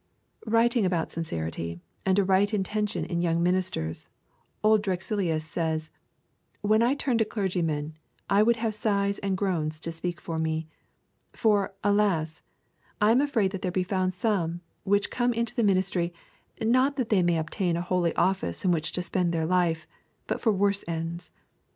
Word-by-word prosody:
Writing 230 +1 +3
about 175 -3 0
sincerity 85 - -4 0.3
and 190 0 +3
a 200 - +4
right 195 +3 +3
intention 210 +1 -1
in 170 -1 -2
young 170 -1 +1
ministers, 175 - 0 0.5
old 215 0 +5
Drexilius 185 -4 -1
says: 160 0 -2 0.7
'When 215 +2 +3
I 245 +4 +3
turn 255 -5 0
to - - +5
clergymen, 170 -8 -2 0.3
I 200 +1 +4
would 235 +2 +4
have 225 -1 -2
sighs 200 -2 0
and 195 -2 -1
groans 160 -6 -1
to 165 - -3
speak 170 +1 -4
for 165 -1 -4
me. 160 0 -1 0.7
For, 205 -3 +1
alas! 200 -6 +1 0.6
I 210 +1 +5
am 245 +4 +5
afraid 235 -10 +1
that 190 -2 -5
there 185 - -1
be 185 +1 0
found 185 -1 -1
some 180 -4 0 0.2
which 205 +1 +2
come 245 0 +1
into 235 0 -1
the 240 - 0
ministry, 185 -4 +1 0.4
not 255 +5 +3
that 255 -5 -2
they 205 -4 +4
may 175 -1 +2
obtain 165 +2 -1
a - - -1
holy 180 -2 0
office 180 - 0
in 180 - +4
which 155 -3 0
to 180 - 0
spend 180 -1 0
their 165 -1 0
life, 170 -2 +1 0.4
but - - -3
for 225 - +3
worse 200 0 +2
ends. 165 +1 -4
185 Hz, 170 wpm, -27 LUFS, 165-210 Hz, 0.7 s, old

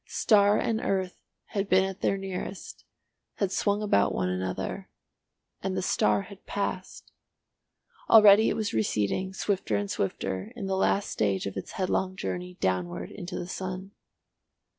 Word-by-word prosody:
Star 205 -2 +4
and 225 0 0
earth 190 -4 -1 0.3
had 200 -1 -2
been 190 +1 +5
at 195 +1 -4
their 195 - +1
nearest, 190 0 -6 0.5
had 200 -3 -1
swung 205 +1 +1
about 100 - +2
one 90 - 0
another, 95 0 -3 0.7
and 190 0 -2
the 185 - -1
star 105 - +2
had 200 -1 -13
passed. 200 -2 -4 1.0
Already 215 0 +8
it - - 0
was 215 -2 -2
receding, 110 - 0
swifter 190 - -1
and 100 0 -1
swifter, 95 - -3
in 220 -5 -5
the 190 0 -1
last 195 +1 +1
stage 100 -3 0
of 100 - -4
its 95 - -6
headlong 190 0 -1
journey 180 -1 -4
downward 90 - -2
into 180 -2 -6
the - - -4
sun. 185 +1 -5
185 Hz, 150 wpm, -28 LUFS, -, 1.0 s, Already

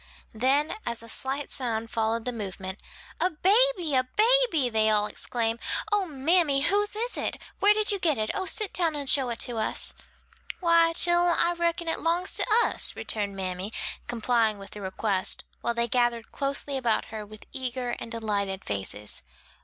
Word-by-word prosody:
Then 270 +7 +2
as 235 -1 -2
a - - -11
slight 270 +5 +1
sound 230 -4 -2
followed 225 0 0
the 250 - -1
movement, 195 -3 -6 0.4
"A 365 - +2
baby! 375 - +3
a 255 -1 +4
baby!" 440 - +3
they 220 -2 +2
all 210 -1 +3
exclaim, 230 +1 -2 0.3
"O, 410 -2 +2
mammy, 295 0 +2
whose 410 +6 +1
is 470 +3 -1
it? - - -2 0.2
where 415 +1 +5
did 430 0 +2
you 400 - 0
get 315 -5 +2
it? 215 0 -1
oh, 385 -1 -2
sit 425 0 -1
down 335 -4 0
and 285 -1 -3
show 265 -2 +3
it 235 - -3
to 240 -2 -3
us!" 215 - -1 0.7
"Why, 335 -1 +4
chillen, 345 0 +4
I 345 - +2
reckon 340 0 -1
it 325 - 0
'longs 345 +3 -1
to - - +1 0.2
us," - - 0
returned 205 -2 -3
mammy, 185 +1 -4 0.4
complying 230 -2 +1
with 195 0 -11
the 210 - -8
request, 190 0 0 0.2
while 235 - -1
they 235 0 +1
gathered 240 -2 0
closely 275 0 -1
about 240 -4 0
her 215 -1 -4
with 215 +1 -13
eager 255 -2 -3
and 230 - -7
delighted 200 -4 -2
faces. 105 +1 -2
255 Hz, 175 wpm, -27 LUFS, 220-340 Hz, 0.7 s, where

